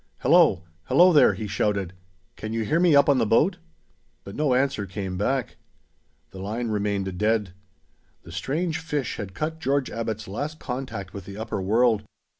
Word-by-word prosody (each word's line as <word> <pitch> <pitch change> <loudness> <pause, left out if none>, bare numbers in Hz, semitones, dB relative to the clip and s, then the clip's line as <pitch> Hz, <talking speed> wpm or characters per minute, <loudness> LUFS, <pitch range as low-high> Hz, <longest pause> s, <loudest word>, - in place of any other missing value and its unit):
"Hello! 85 - +4 0.2
Hello 180 +1 +5
there!" 150 - +6
he 110 - -5
shouted. 100 -2 -1 0.4
"Can 110 +1 -6
you 115 0 -1
hear 155 +9 +1
me 175 -4 +5
up 140 0 +6
on 140 -3 +4
the - - +3
boat?" 175 - +3 0.6
But 100 - -9
no 145 -4 +2
answer 130 -6 0
came 95 0 -5
back. 125 +5 -1 0.7
The 95 - -10
line 110 +5 -3
remained 100 -3 -2
dead. 105 -3 +1 0.7
The 85 - -12
strange 155 - -2
fish 150 -5 -3
had 95 -4 -7
cut 160 - -3
George 140 -2 0
Abbot's 110 -1 -4
last 145 +10 -4
contact 125 -7 -5
with 100 -3 -8
the 100 0 -9
upper 110 -3 -4
world. 110 +2 +3
115 Hz, 170 wpm, -25 LUFS, 100-140 Hz, 0.7 s, there